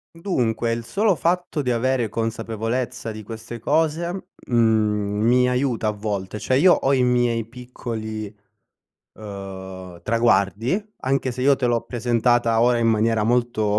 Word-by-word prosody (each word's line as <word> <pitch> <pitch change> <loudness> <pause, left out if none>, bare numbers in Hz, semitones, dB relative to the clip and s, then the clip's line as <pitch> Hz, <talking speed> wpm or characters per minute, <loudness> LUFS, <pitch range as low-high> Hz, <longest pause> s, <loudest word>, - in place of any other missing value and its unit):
Dunque 120 - -1
il 115 0 -3
solo 205 - +2
fatto 175 -2 -1
di 125 -3 -1
avere 120 -1 +1
consapevolezza 115 +2 -3
di 110 0 -8
queste 115 +2 -8
cose, 165 - -1 0.2
mhmm, 105 -3 +2
mi 125 +2 +4
aiuta 125 -3 0
a - - +3
volte. 105 -1 -4
Cioè, 130 +4 0
io 175 +6 +6
ho 135 +1 +2
i 130 - +2
miei 120 -2 +2
piccoli, 110 -3 -6 0.8
uhm, 95 -3 -9
traguardi, 115 - +2 0.2
anche 130 -1 0
se 125 - -4
io 140 0 +5
te 125 - 0
l'ho 120 -1 +2
presentata 120 -1 +1
ora 120 0 +4
in 115 - +1
maniera 110 -1 +2
molto 115 -3 +1
115 Hz, 145 wpm, -22 LUFS, 110-125 Hz, 0.8 s, io